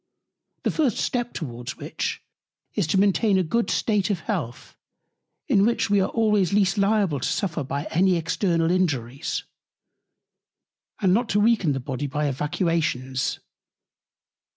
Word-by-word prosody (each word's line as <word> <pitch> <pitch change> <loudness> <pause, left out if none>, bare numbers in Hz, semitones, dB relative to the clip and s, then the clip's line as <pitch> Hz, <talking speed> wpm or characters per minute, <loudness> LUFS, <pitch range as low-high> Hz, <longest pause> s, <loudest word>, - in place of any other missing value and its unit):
The - - +1
first 280 -9 +1
Step 240 -1 -1
towards 120 -5 -6
which, - - -4 0.5
is - - 0
to 175 - +1
maintain 200 +1 +3
a 185 - +2
good 230 +8 0
State 210 -3 +1
of 190 -5 -1
Health, 120 -4 -4 0.7
in 210 -10 +4
which 225 -1 +1
we 200 -1 +4
are 190 - 0
always 210 -5 +2
least 195 -1 +3
liable 200 -7 +2
to - - -1
suffer 170 -6 -1
by 140 +2 -3
any 185 +2 +3
external 165 0 +1
Injuries; 140 -7 -1 1.6
and 185 -3 +4
not 230 +3 +1
to 205 - +2
weaken 205 -8 +3
the 135 - -2
Body 135 +2 -4
by 150 +2 -2
Evacuations. 145 -2 -1
180 Hz, 140 wpm, -24 LUFS, 145-205 Hz, 1.6 s, in